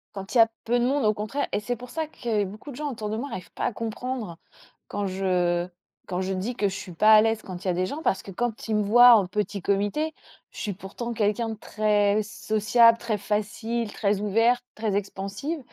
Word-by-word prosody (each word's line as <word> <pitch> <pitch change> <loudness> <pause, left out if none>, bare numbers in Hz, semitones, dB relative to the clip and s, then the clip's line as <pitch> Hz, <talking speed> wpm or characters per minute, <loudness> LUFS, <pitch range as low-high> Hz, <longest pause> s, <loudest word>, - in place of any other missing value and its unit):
Quand 195 0 -7
il 250 - +2
y - - +10
a 225 - +7 0.2
peu 240 +1 +1
de 240 - +2
monde 270 -1 +1
au 215 - +4
contraire 215 +7 -3
et - - 0
c'est 245 +4 -3
pour 245 +1 -11
ça 320 -1 -2
que 225 -8 -1
beaucoup 215 +9 -8
de - - -9
gens 295 +1 -3
autour 215 -4 -5
de 220 - -2
moi 280 +4 -4
arrivent 185 - -7
pas - - -3
à 240 - 0
comprendre, 230 -4 -4 0.5
quand 205 0 -3
je 180 -2 0 0.4
quand 185 0 -2
je 190 +1 -2
dis 200 +7 -3
que 210 -4 +1
je 190 - -3
suis 180 -3 -7
pas 215 +6 +6
à 215 - +9
l'aise 225 0 0
quand 185 -1 -8
il - - -4
y - - +2
a - - 0
des 180 +1 0
gens, 290 +11 -5
parce 195 - 0
que 195 - -9
quand 230 +3 -3
ils 220 - 0
me 210 - +2
voient 240 +4 +8
en 205 -5 +4
petit 200 +1 -2
comité, 205 - 0 0.3
je - - -17
suis 205 -3 -2
pourtant 205 +5 -6
quelqu'un 215 +1 0
de 225 - -3
très 210 -1 +1
sociable, 230 +2 +3
très 230 -3 -2
facile, 215 +2 -2
très 200 -2 0
ouverte, 230 +4 +2
très 215 -2 -2
expansive. 200 - -3
215 Hz, 240 wpm, -26 LUFS, 200-235 Hz, 0.5 s, y